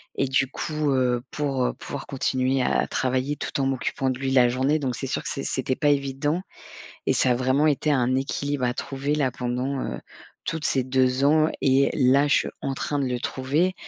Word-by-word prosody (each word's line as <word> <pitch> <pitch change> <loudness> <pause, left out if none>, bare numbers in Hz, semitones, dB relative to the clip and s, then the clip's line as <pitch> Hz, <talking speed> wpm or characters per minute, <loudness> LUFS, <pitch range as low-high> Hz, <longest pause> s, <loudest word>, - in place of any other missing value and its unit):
Et - - +1
du 135 +1 +2
coup, 150 +2 -2
heu, 125 -2 +1
pour, 140 -3 -1
heu, 125 - 0
pouvoir 140 - -7
continuer 130 -1 0
à - - +1
travailler 130 +3 -1
tout - - -4
en 135 - +1
m'occupant 135 0 -1
de 130 - -2
lui 135 0 -2
la 125 -2 +5
journée, 135 +5 +1
donc 130 -4 -2
c'est 135 - -5
sûr 135 - -2
que - - -5
c'est 135 - -4
c'était 130 0 -1
pas 145 - +2
évident 145 +4 0 0.6
et - - +2
ça 130 - +3
a - - +3
vraiment 130 +4 +2
été 150 +1 +1
un 130 -2 +2
équilibre 140 +1 -2
à 125 0 +1
trouver 140 +3 -2
là, 140 -4 +1
pendant, 125 +3 -2
heu, - - -4 0.5
toutes 160 0 -3
ces 130 -4 +1
2 130 +1 +2
ans, 155 +2 +4
et 135 +1 +4
là, 135 +1 +4
je - - +4
suis - - -1
en 135 - -2
train 145 +2 -2
de 140 - 0
le 125 -1 -2
trouver. 145 +9 0
135 Hz, 215 wpm, -25 LUFS, 130-145 Hz, 0.6 s, la